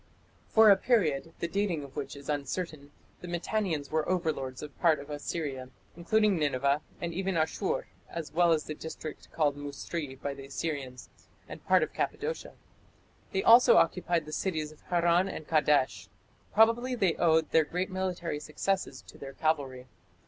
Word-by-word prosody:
For 220 -1 +7
a 195 - +6
period, 165 - +1
the 170 - -2
dating 185 -4 -1
of 135 -1 -12
which 145 -1 -5
is 140 0 -11
uncertain, 145 +1 -3 0.3
the 180 - -9
Mitannians 175 -4 -2
were 155 +1 0
overlords 155 -8 -2
of 150 -2 -9
part 165 -3 +4
of 145 +1 -9
Assyria, 145 -3 -4 0.3
including 205 +3 +2
Nineveh 140 0 +1 0.2
and 170 -1 -3
even 190 +1 -1
Asshur, 160 +4 0 0.2
as 165 -3 -6
well 170 +1 +4
as 155 -2 +2
the 155 - -5
district 155 0 -8
called 150 -3 +1
"Musri" 145 0 -6
by 140 - -3
the 135 0 -10
Assyrians, 135 -3 -5 0.4
and - - -10
part - - +5
of - - -4
Cappadocia. 470 +2 -3 0.8
They 190 - 0
also 235 +2 +8
occupied 170 -1 +2
the 155 - -8
cities 155 -5 -2
of 155 - -18
Harran 175 +1 +3
and 155 - -7
Kadesh. 150 -4 +2 0.4
Probably 230 +3 +3
they 190 -8 +2
owed 160 -2 +3
their 160 - +5
great 180 +5 -3
military 180 -4 -2
successes 190 +6 -2
to - - -15
their 135 -1 -8
cavalry. 140 -6 -1
160 Hz, 165 wpm, -29 LUFS, 145-185 Hz, 0.8 s, also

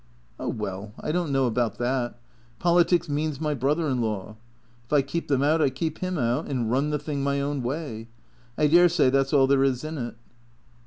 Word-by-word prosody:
" - - -35
Oh, - - -3
well, 105 -1 -5
I - - -3
don't 170 -2 -1
know 135 -1 +2
about 120 -1 0
that. 120 0 -1 0.4
Politics 175 0 +3
means 150 -1 -2
my 155 -1 0
brother 145 +4 0
in 130 -3 0
law. 110 -2 -3 0.5
If 120 - -28
I 145 -2 +4
keep 165 +5 -4
them 140 -1 +2
out 155 +3 +3
I 145 - +4
keep 155 +4 -4
him 185 -1 -2
out, 125 +3 0
and 120 -5 -1
run 140 +4 +1
the 150 - 0
thing 145 -1 -4
my 140 0 0
own 140 0 -2
way. 120 -3 -4 0.5
I 150 - +3
dare 175 +4 +6
say 155 -6 +3
that 135 0 +2
's - - -8
all 135 -2 +6
there 135 0 +3
is 130 -1 0
in 155 -1 -5
it." 120 -2 -5
140 Hz, 220 wpm, -25 LUFS, 125-155 Hz, 0.5 s, dare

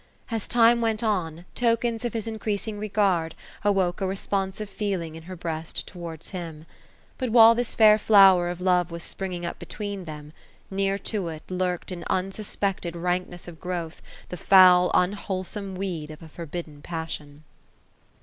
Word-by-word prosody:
As 225 -3 -3
time 235 0 +5
went 225 -1 0
on, 175 -6 -1
tokens 235 -1 +1
of 240 - -2
his 225 -1 -3
increasing 215 -1 -3
regard, 195 -6 +1 0.3
awoke 195 -2 +1
a 190 - +1
responsive 195 +1 -2
feeling 195 -5 -3
ii» 165 - -9
her 185 +3 -9
breast 165 -2 -4
towards 170 -3 -8
him. 165 -4 -7 0.5
But 255 -2 -1
while 225 0 +8
this 240 0 -1
fair 215 -1 +7
flower 195 -5 +6
of 175 0 -5
love 180 -2 +2
was 170 0 -6
springing 180 -3 -5
up 170 - -5
between 205 -3 -6
them. 150 -1 -9 0.2
— - - -32
near 195 0 0 0.2
to 200 -5 -1
it 155 -2 -7
lurked 180 0 -2
in 175 -2 -6
unsuspected 195 -2 -2
rankness 180 0 -3
of 165 -2 -10
growth, 175 -3 -4 0.3
the 180 - -6
foul 180 -1 +7
unwholesome 190 +1 -1
weed 180 -5 -4
of 155 +1 -10
a 160 - -11
forbidden 160 -2 -7
passion. 155 -3 -6
185 Hz, 160 wpm, -25 LUFS, 170-205 Hz, 0.5 s, while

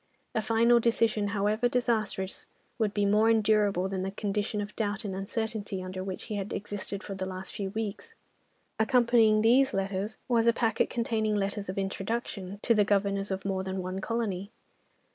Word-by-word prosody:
A 220 - +1
final 230 +2 +4
decision, 225 -2 +2
however 210 +3 +1
disastrous, 220 -6 -1 0.3
would 215 -3 +2
be 205 0 +1
more 210 +3 +4
endurable 210 -4 +3
than 190 -1 -3
the 190 - -2
condition 205 +1 -2
of 205 0 -5
doubt 215 -1 -2
and 195 - -3
uncertainty 205 -1 -3
under 185 0 -5
which 190 -1 -5
he 215 -3 -4
had 200 0 -4
existed 205 0 -5
for 200 - -5
the 190 -1 -4
last 190 0 -6
few 195 -2 -3
weeks. 220 - -5 0.6
Accompanying 230 -2 +4
these 260 +4 +4
letters 195 +2 -2
was 235 -2 +3
a 235 - +6
packet 225 -2 +1
containing 220 -3 0
letters 200 0 -2
of 185 - -4
introduction 195 0 -3
to 235 - +4
the 210 -2 +4
Governors 200 0 +1
of 190 0 -3
more 190 -1 -1
than 190 0 -3
one 185 +1 -4
colony. 200 -4 -2
205 Hz, 175 wpm, -29 LUFS, 195-225 Hz, 0.6 s, a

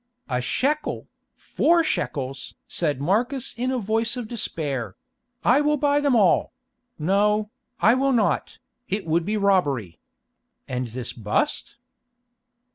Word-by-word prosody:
"A 125 -2 -1
shekel! 290 - -1 0.3
Four 335 0 +2
shekels!" 135 - -3
said 150 -6 -1
Marcus 240 - 0
in 250 +2 -1
a 260 - 0
voice 225 +2 -1
of 240 -3 -4
despair; 140 - -3 0.5
"I 265 +4 +5
will 300 0 +2
buy 290 0 +2
them 285 -3 +2
all—no, 210 - +1 0.3
I 225 - +5
will 270 +2 +2
not, 235 -5 +1 0.3
it 200 0 -2
would 165 +1 +1
be 215 +2 0
robbery. 145 - +1 0.7
And 125 -1 -2
this 120 +1 -6
bust?" 110 - -1
210 Hz, 120 wpm, -24 LUFS, -, 0.7 s, I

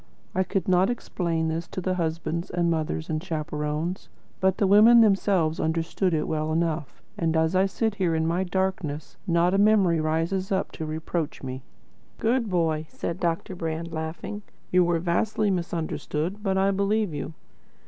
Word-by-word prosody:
I 185 - +1
could 190 -1 -1
not 185 +2 +4
explain 170 -8 -1
this 165 +1 -2
to - - -5
the 185 0 -1
husbands 170 0 -2
and 175 -1 +1
mothers 155 - -2
and 155 +1 -2
chaperons, 155 +1 -3 0.3
but 190 0 +2
the 205 - +2
women 215 +4 +7
themselves 195 -6 +2
understood 165 +3 0
it 155 -2 0
well 155 0 -1
enough; 160 -2 -2 0.2
and 165 -1 +1
as 160 +2 +2
I 190 +1 +4
sit 220 +2 -1
here 170 -3 +2
in 160 0 +1
my 170 +3 +1
darkness 180 -5 -2
not 170 +1 +3
a 195 - +3
memory 200 -5 +4
rises 165 +5 -1
up 190 0 0
to 160 - -5
reproach 160 0 -3
me." 130 0 -5 0.6
"Good 235 0 +1
boy," 160 -3 0
said 170 +3 -4
Deryck 170 +1 -1
Brand, 165 0 -3
laughing. 160 +6 -5 0.3
"You 180 0 +5
were 170 -1 +2
vastly 195 +5 +1
misunderstood, 170 +1 -2
but 195 -2 0
I 195 +1 +3
believe 200 -1 +1
you." 145 +2 -5
170 Hz, 170 wpm, -26 LUFS, 160-190 Hz, 0.6 s, women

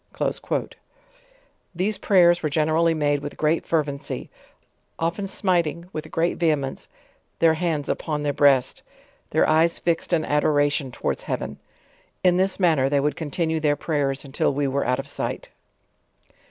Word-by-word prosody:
'* - - -35
These 195 +4 -1
prayers 175 -3 +4
were 155 - -1
generally 160 +2 +2
made 145 -2 +1
with 145 +1 -7
great 155 +2 0
fervency, 150 -4 -2 0.7
often 170 +5 -2
smiting 170 -4 0
with 155 0 -6
great 170 +1 0
vehemence, 150 -5 -1 0.5
their 165 -1 +4
hands 160 -3 -1
upon 150 -2 -2
their 145 -1 0
breast, 135 -3 +3 0.5
their - - +2
eyes 160 +2 +3
fixed 170 0 -1
in 165 -3 +2
adoration 145 -2 +1
towards - - -3
heaven. - - -4 0.6
In 180 -1 +4
this 190 +1 +1
manner 155 -8 +3
they 140 0 +2
would 145 0 0
continue 160 +1 -1
their 150 -1 +2
prayers 145 -2 -1
until 135 +1 0
we 140 0 -1
were 135 0 -1
out 125 0 +2
of 135 - -5
sight. - - -4
155 Hz, 145 wpm, -23 LUFS, 145-170 Hz, 0.7 s, prayers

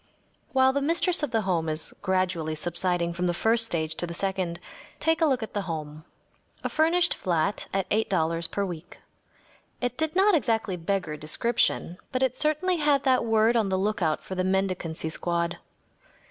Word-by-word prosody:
While 265 0 +4
the 280 - 0
mistress 340 +4 +1
of 295 - -1
the 225 -2 +1
home 170 -5 0
is 155 0 -3
gradually 185 -5 0
subsiding 170 +1 +1
from 180 +1 -1
the 175 - 0
first 225 +4 +2
stage 160 -5 -1
to 175 - -2
the 170 - -6
second, 185 -3 -1 0.4
take 325 +1 +1
a 320 - +5
look 260 -5 +1
at 220 - -7
the 205 - -1
home. 155 -1 -5 0.6
A - - -1
furnished 330 +2 +3
flat 185 +2 -1
at 195 -1 -1
$8 170 -6 +1
per 200 - -1
week. 175 -2 -8 0.8
It 245 +1 -3
did 315 +1 -1
not 395 +2 +5
exactly 225 - +1
beggar 180 -2 -2
description, 175 +2 0
but 255 0 0
it 255 -1 +1
certainly 310 +6 +1
had 295 -3 +2
that 260 -3 +3
word 225 0 +3
on 220 -4 +2
the 190 - +1
lookout 190 -5 0
for - - -7
the 185 0 -1
mendicancy 185 -4 -1
squad. 170 +1 -1
195 Hz, 175 wpm, -26 LUFS, 170-255 Hz, 0.8 s, a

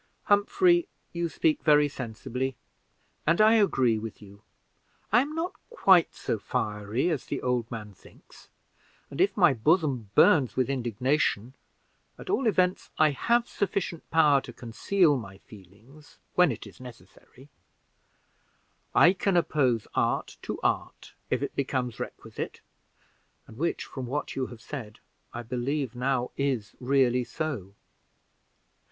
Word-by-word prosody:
"Humphrey, 345 - +3 0.3
you 170 -1 -2
speak 310 - +1
very 150 -1 +5
sensibly, 130 0 -4 0.7
and 165 +1 +3
I 215 +1 +6
agree 130 - +3
with 110 0 -7
you. 100 -1 -15 0.7
I 235 +4 +6
am 295 +3 -4
not 335 +3 -2 0.2
quite 190 - +4
so 110 - -3
fiery 105 - -2
as 150 - -3
the - - -3
old 125 -2 0
man 105 -3 -7
thinks; - - -19 0.6
and 140 - -2
if 195 +2 +2
my 175 -7 +5
bosom 135 - +1
burns 145 - +5
with 130 +1 +1
indignation, 125 -1 0 0.6
at - - -6
all 270 - +1
events 185 -3 +1
I 155 -1 +4
have 235 - +1
sufficient 185 -4 -3
power 150 -4 +4
to 125 - -10
conceal 145 - +1
my 95 -5 -9
feelings 110 +10 -17 0.2
when 180 -5 +4
it 115 - -7
is - - -14
necessary; 125 +3 -15 1.5
I 175 - +7
can 195 -1 0
oppose 130 -9 +1
art - - -1
to - - -5
art, - - -2 0.2
if - - 0
it - - -4
becomes 130 -4 -2
requisite, - - -7 0.8
and 110 - -14
which, 165 +8 -2
from 130 -3 -7
what 145 +4 -3
you 130 -1 -2
have 120 -2 -12
said, 115 -5 -8 0.3
I 120 - -6
believe 125 +2 -2
now 125 0 -1
is 130 -7 -1
really 125 -1 +2
so. 115 - -5
135 Hz, 135 wpm, -27 LUFS, 115-170 Hz, 1.5 s, I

